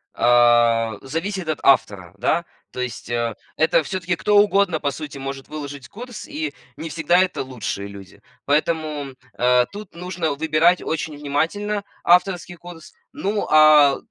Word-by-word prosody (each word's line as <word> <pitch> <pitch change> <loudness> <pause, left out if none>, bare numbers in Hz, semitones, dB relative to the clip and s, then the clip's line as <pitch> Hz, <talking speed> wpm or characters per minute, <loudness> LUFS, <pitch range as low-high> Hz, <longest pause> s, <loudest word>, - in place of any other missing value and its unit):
э, 120 -2 +4
зависит 170 +6 -4
от 155 - -2
автора. 100 -9 +2
Да, - - +1 0.3
то - - -8
есть, 105 -4 -6
э, 120 -2 -1 0.2
это 160 0 +3
всё-таки 180 0 -2
кто 210 0 +2
угодно, 200 -5 +3
по 140 - 0
сути, 150 -1 -8
может 135 0 -6
выложить 145 -3 -7
курс, 245 +2 -9
и 150 -1 -4 0.2
не 160 0 -6
всегда 165 +3 +2
это 185 -1 0
лучшие 100 -6 -5
люди. 100 0 -13 0.2
Поэтому, 150 -1 -1 0.2
э, 125 0 +4
тут 205 -3 -10
нужно 175 -2 -3
выбирать 160 +4 +2
очень 155 -1 -3
внимательно 200 +9 -2 0.2
авторский 175 0 +2
курс. 170 -2 -12 0.2
Ну, 205 +2 -2
а 150 -2 +6
155 Hz, 145 wpm, -21 LUFS, 130-175 Hz, 0.3 s, а